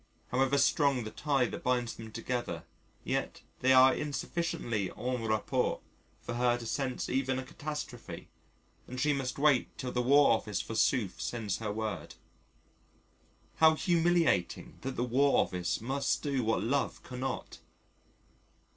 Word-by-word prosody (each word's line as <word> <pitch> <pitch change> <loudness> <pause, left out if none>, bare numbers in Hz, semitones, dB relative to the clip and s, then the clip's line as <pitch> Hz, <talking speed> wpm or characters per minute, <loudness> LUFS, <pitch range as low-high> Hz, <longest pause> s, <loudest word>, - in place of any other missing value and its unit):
However 135 +2 +2
strong 140 -3 +3
the 110 - -6
tie 140 -4 +1
that - - -5
binds 125 -2 0
them 110 -1 -10
together 115 -7 -3 0.4
yet - - -2 0.2
they 130 - +3
are 130 0 +7
insufficiently 145 - -2
en 125 0 -2
rapport 110 -1 0 0.4
for - - -4
her 120 0 +2
to 120 - -8
sense 130 +2 -2
even 130 0 0
a 130 - -3
catastrophe 150 -2 -7 0.6
and 125 0 -6
she 150 +3 +2
must 135 -2 -3
wait 140 -3 +2
till 125 - -4
the 125 - 0
War 140 +3 +5
Office 105 -3 0
forsooth 115 -2 0
sends 110 -6 -2
her 110 -2 -3
word. 110 -1 -4 1.4
How 160 0 +6
humiliating 170 - +1
that 135 0 -4
the 120 - 0
War 135 +3 +3
Office 90 0 -1
must 135 +4 -1
do 140 -4 0
what 110 -3 +1
Love 135 +5 -1
cannot. 130 +1 -5
125 Hz, 140 wpm, -31 LUFS, 115-140 Hz, 1.4 s, are